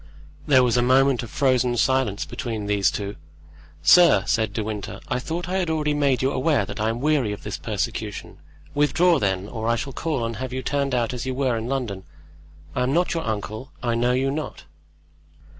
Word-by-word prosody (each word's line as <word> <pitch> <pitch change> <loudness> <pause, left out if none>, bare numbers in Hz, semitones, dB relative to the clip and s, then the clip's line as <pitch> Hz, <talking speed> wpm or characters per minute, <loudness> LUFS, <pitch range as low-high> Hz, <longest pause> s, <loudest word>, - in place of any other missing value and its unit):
There 130 -3 +6
was 125 -1 +2
a - - +4
moment 130 +1 +4
of 120 - -7
frozen 125 -3 +1
silence 130 -5 +1
between 115 -6 -4
these 100 -4 +2
two. 100 +4 -5 0.7
"Sir," 175 - +7
said 110 -3 +1
De 110 +1 -2
Winter, 105 -2 -5
"I - - 0
thought 165 +6 -4
I 185 +1 -1
had 175 -3 -1
already 150 -2 0
made 140 -4 +1
you 135 - +2
aware 130 -5 +1
that - - -7
I 110 +1 +1
am 115 +2 -3
weary 145 -7 +2
of 105 - -9
this - - -5
persecution; - - -4 0.3
withdraw, 150 +3 +3
then, 95 -2 -1
or 110 0 -4
I 115 - +3
shall 135 +3 -4
call 150 -4 -2
and 115 -1 -4
have 130 +1 -5
you 130 0 -3
turned 140 -2 0
out 120 -1 0
as 125 +1 -4
you 130 - -2
were 130 -3 +1
in 115 +1 -3
London. 120 -8 -3 0.7
I - - -1
am 125 +2 +1
not 175 +2 +2
your 165 -5 -3
uncle, 110 +5 -4
I 120 -1 +1
know 120 +2 +2
you 135 +2 +1
not." 150 +2 -5
125 Hz, 210 wpm, -23 LUFS, 110-140 Hz, 0.7 s, Sir